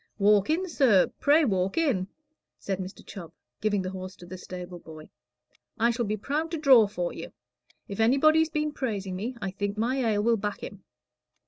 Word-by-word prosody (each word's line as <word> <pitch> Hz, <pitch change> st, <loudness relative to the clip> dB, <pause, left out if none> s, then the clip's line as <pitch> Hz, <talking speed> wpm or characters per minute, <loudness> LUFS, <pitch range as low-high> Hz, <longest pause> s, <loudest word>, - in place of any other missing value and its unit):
"Walk 205 Hz, +1 st, +4 dB
in, 350 Hz, +4 st, +1 dB
sir 250 Hz, -, +3 dB
pray 300 Hz, +2 st, +4 dB
walk 190 Hz, -, 0 dB
in," 255 Hz, -, +1 dB, 0.5 s
said 195 Hz, -1 st, -4 dB
Mr. 190 Hz, +1 st, -8 dB
Chubb, 175 Hz, -6 st, -10 dB, 0.3 s
giving 205 Hz, -2 st, 0 dB
the 185 Hz, -, -4 dB
horse 185 Hz, 0 st, -7 dB
to 175 Hz, -, -13 dB
the 185 Hz, +2 st, -8 dB
stable 180 Hz, -1 st, -8 dB
boy. 155 Hz, -2 st, -12 dB, 0.7 s
"I 235 Hz, +2 st, +3 dB
shall 235 Hz, 0 st, -2 dB
be 210 Hz, +1 st, -2 dB
proud 295 Hz, +9 st, -2 dB
to 330 Hz, -, -3 dB
draw 265 Hz, -8 st, +6 dB
for 180 Hz, -4 st, -3 dB
you. -, -, -8 dB, 0.6 s
If 200 Hz, -, -7 dB
anybody's 310 Hz, +7 st, +4 dB
been 300 Hz, -1 st, -1 dB
praising 200 Hz, -9 st, -3 dB
me, 230 Hz, +7 st, -4 dB
I 195 Hz, -, -2 dB
think 205 Hz, +1 st, -3 dB
my 240 Hz, +5 st, 0 dB
ale 220 Hz, -5 st, +1 dB
will 230 Hz, 0 st, +3 dB
back 205 Hz, 0 st, -4 dB
him." 200 Hz, -2 st, -9 dB
210 Hz, 190 wpm, -27 LUFS, 190-265 Hz, 0.7 s, draw